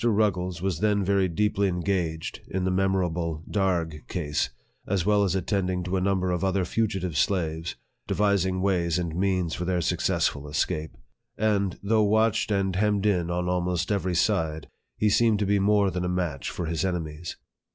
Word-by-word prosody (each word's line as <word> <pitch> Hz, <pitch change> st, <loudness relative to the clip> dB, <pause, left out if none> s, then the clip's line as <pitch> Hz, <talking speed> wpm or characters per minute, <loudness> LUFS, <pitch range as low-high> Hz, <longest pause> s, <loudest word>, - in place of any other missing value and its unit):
Rug 105 Hz, -3 st, +3 dB
gles 90 Hz, 0 st, -5 dB
was 95 Hz, -5 st, -1 dB
then 105 Hz, -1 st, +2 dB
very 100 Hz, 0 st, +2 dB
deeply 100 Hz, +3 st, +1 dB
engaged 90 Hz, -3 st, -2 dB
in 95 Hz, 0 st, -2 dB
the 95 Hz, -, +1 dB
memorable 90 Hz, -4 st, 0 dB
Darg 85 Hz, -6 st, -1 dB
case, 75 Hz, -7 st, -1 dB, 0.4 s
as 95 Hz, -3 st, 0 dB
well 105 Hz, 0 st, +4 dB
as 95 Hz, -1 st, +1 dB
attending 95 Hz, -2 st, -1 dB
to 90 Hz, +1 st, -2 dB
a 95 Hz, -, +1 dB
number 95 Hz, -1 st, +1 dB
of 90 Hz, +1 st, -1 dB
other 95 Hz, -1 st, +1 dB
fugitive 95 Hz, -5 st, -1 dB
slaves, 80 Hz, -2 st, 0 dB, 0.3 s
devising 95 Hz, -3 st, +1 dB
ways 90 Hz, -4 st, +1 dB
and 85 Hz, -3 st, -2 dB
means 90 Hz, -3 st, 0 dB
for 90 Hz, -, -3 dB
their 90 Hz, 0 st, 0 dB
suc 85 Hz, -, 0 dB
cessful 70 Hz, +1 st, 0 dB
escape; 75 Hz, +1 st, -2 dB, 0.4 s
and, 100 Hz, -3 st, +1 dB
though 110 Hz, +2 st, +3 dB
watched 110 Hz, +1 st, +2 dB
and 95 Hz, -2 st, 0 dB
hemmed 105 Hz, 0 st, +1 dB
in 90 Hz, -5 st, +2 dB
on 90 Hz, 0 st, -1 dB
almost 90 Hz, 0 st, 0 dB
every 95 Hz, -3 st, 0 dB
side, 80 Hz, -5 st, 0 dB, 0.3 s
he 105 Hz, -, +2 dB
seemed 110 Hz, +1 st, +4 dB
to 105 Hz, -, 0 dB
be 100 Hz, +1 st, +2 dB
more 100 Hz, 0 st, +3 dB
than 90 Hz, 0 st, -2 dB
a 90 Hz, -, -1 dB
match 85 Hz, -6 st, -2 dB
for 85 Hz, -, -4 dB
his 80 Hz, -1 st, -1 dB
enemies. 85 Hz, -3 st, -3 dB
95 Hz, 180 wpm, -26 LUFS, 85-100 Hz, 0.4 s, well